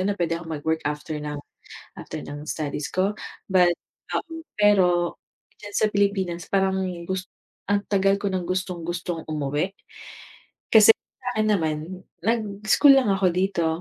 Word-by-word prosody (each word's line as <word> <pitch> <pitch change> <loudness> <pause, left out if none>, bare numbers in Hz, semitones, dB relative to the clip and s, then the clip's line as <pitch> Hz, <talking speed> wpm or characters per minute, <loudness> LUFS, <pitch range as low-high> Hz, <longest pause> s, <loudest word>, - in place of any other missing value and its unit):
na 200 +2 +1
puwede 165 -2 0
akong 165 -1 -7
mag-work 160 +2 -1
after 150 +1 -3
ng 150 -1 -5 0.6
after - - -7
ng 145 +1 -8
studies 150 -2 -3
ko, 190 +3 +1 0.4
but, 180 -2 +5 0.4
um, 325 -1 -4
pero 180 -4 +3 0.4
diyan 205 -1 -10
sa 215 - +3
Pilipinas 195 -4 0
parang 190 -1 +2 0.3
gust 185 0 -3 0.4
ang 200 0 +2
tagal 195 0 +3
ko 205 - -1
nang 185 -2 -1
gustong-gustong 175 -2 -3
umuwi. 150 +4 -1 1.0
Kasi 220 0 +9
sa 255 - -21
akin 215 0 +1
naman, 160 -7 +1 0.5
nag-school 215 - +4
lang 260 -6 +3
ako 195 -1 +2
dito 185 -2 +1
185 Hz, 140 wpm, -24 LUFS, 165-205 Hz, 1.0 s, Kasi